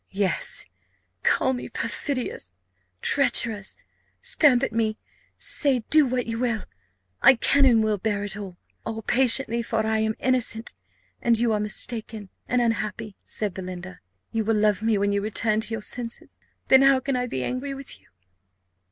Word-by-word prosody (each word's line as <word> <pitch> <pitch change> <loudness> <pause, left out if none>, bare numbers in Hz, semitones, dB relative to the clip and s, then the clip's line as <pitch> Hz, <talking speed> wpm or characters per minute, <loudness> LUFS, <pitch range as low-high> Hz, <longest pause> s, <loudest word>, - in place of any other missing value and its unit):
"Yes, 195 -1 -1 0.6
call 260 - +1
me 250 - -6
perfidious, 255 - -4 0.5
treacherous 230 -7 +2 0.4
stamp 275 -5 +4
at 245 - -2
me 220 -1 -1 0.4
say, 265 -6 +3
do 305 -3 +5
what 250 -1 -2
you 230 0 -4
will; 235 -3 -1 0.6
I 265 - +7
can 275 +4 +3
and 230 -4 +4
will 215 -2 -1
bear 205 0 -2
it 205 -1 -2
all 195 -4 -8 0.3
all 225 0 -6
patiently; 245 -1 +5
for 225 -1 -2
I 220 0 0
am 220 0 -1
innocent, 240 -3 0 0.5
and 235 -1 +2
you 230 -1 +1
are 210 - 0
mistaken 215 -1 -2 0.2
and 250 -1 +1
unhappy," 215 -2 -3
said 210 -3 0
Belinda. 185 0 -8 0.3
"You 225 -1 -1
will 220 0 0
love 210 -1 +1
me 220 -1 +1
when 200 0 0
you 200 0 0
return 215 +1 0
to 225 - -3
your 215 - -7
senses; 235 0 -6 0.3
then 265 0 +6
how 270 -1 +5
can 270 0 -3
I 250 0 -2
be 130 - -4
angry 275 - -4
with 275 0 -9
you?" - - -29
225 Hz, 165 wpm, -24 LUFS, 210-250 Hz, 0.6 s, I